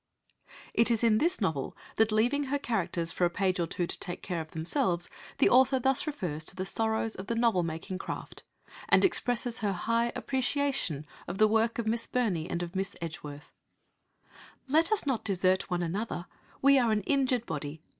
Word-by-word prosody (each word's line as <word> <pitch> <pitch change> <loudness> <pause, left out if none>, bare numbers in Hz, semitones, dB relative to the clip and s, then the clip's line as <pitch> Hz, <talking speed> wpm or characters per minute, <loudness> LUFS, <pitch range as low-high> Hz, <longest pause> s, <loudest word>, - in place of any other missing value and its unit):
It 230 - +3
is 230 -1 +1
in 220 -2 +4
this 345 +4 +1
novel 160 - -2 0.2
that, 220 0 +3
leaving 245 +7 +2
her 280 +2 0
characters 185 -10 -1
for - - -2
a - - +2
page 185 +1 0
or 170 - 0
two 175 - -2
to - - -5
take 175 -2 -5
care 175 -3 -2
of 160 - -9
themselves, 175 - 0 0.3
the - - +5
author 260 +2 +5
thus 265 +4 +2
refers 175 - -3
to - - -2
the 185 - -3
sorrows 220 +2 0
of 190 +1 -6
the 230 - -1
novel 230 -5 +3
making 170 +3 -4
craft, - - -7 0.5
and - - +6
expresses 245 -8 +1
her 205 -2 0
high 230 +5 0
appreciation 265 - -1 0.2
of 175 - -4
the 215 - +5
work 225 +2 +1
of 235 - -2
Miss 230 +1 0
Burney 200 -11 -1
and 175 0 -2
of 175 +2 -7
Miss 195 +1 -2
Edgeworth 150 -3 -7 1.2
"Let 320 +7 +3
us 430 - +2
not 265 -5 0
desert 185 -2 +1
one 175 -1 0
another 180 +1 -3 0.4
we 275 0 +6
are 235 -3 +2
an 215 -1 +1
injured 255 0 +1
body. 150 -1 -5
215 Hz, 190 wpm, -29 LUFS, 175-245 Hz, 1.2 s, and